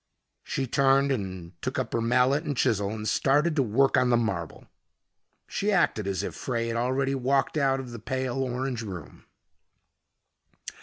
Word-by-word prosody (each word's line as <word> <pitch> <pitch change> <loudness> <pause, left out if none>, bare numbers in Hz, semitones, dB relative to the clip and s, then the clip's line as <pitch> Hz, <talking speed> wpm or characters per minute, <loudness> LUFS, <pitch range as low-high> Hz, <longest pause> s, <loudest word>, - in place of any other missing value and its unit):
She 135 - -2
turned, 130 - +1
took 130 +2 -3
up 130 -3 -2
her 115 - +1
mallet 125 +5 +3
and 145 -3 -3
chisel, 100 -4 +1
and 110 0 -4
started 145 +8 +2
to 145 - +3
work 135 +3 +3
on 125 - +3
the 120 - +4
marble. 95 -8 -3 0.8
She 210 +1 -1
acted 140 - +2
as 95 -1 -1
if - - -4
Frey 115 -2 -2
had 115 - -2
already 130 +3 0
walked 135 +1 +1
out 135 -3 +2
of 130 -2 -7
the 115 - -7
pale 130 +3 -2
orange 125 -1 -2
room. 90 -9 -9
125 Hz, 160 wpm, -27 LUFS, 110-135 Hz, 0.8 s, the